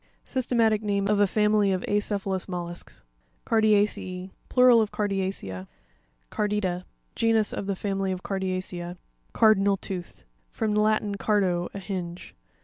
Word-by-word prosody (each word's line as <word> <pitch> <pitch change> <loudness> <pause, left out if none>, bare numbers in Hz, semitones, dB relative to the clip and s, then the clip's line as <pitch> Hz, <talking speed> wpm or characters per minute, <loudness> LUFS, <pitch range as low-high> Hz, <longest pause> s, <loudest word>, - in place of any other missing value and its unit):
Systematic 230 -4 +1
name 200 -2 0
of 210 0 +2
a 205 - +5
family 210 0 +2
of 185 -1 0
acephalous 200 -2 -1
mollusks 175 -1 -6 0.4
(page 225 -1 +2
83). 200 -3 +1 0.2
Carpia'cE&.—Plural 250 -2 +6
of 215 - -1
Cardiacea. 190 - -3 0.6
Car'pita.—Genus 210 - -1
of 195 - -4
the 200 - -1
family 195 0 -2
of 185 -1 -4
Cardiacea. 185 -2 -3 0.4
CarpviNaL 200 -3 +4
(tooth).—From 195 +4 -5
the 210 - +3
Latin 215 -1 +1
cardo, 185 -5 +1
a - - -3
hinge. 180 - -6
200 Hz, 125 wpm, -26 LUFS, 185-210 Hz, 0.6 s, Carpia'cE&.—Plural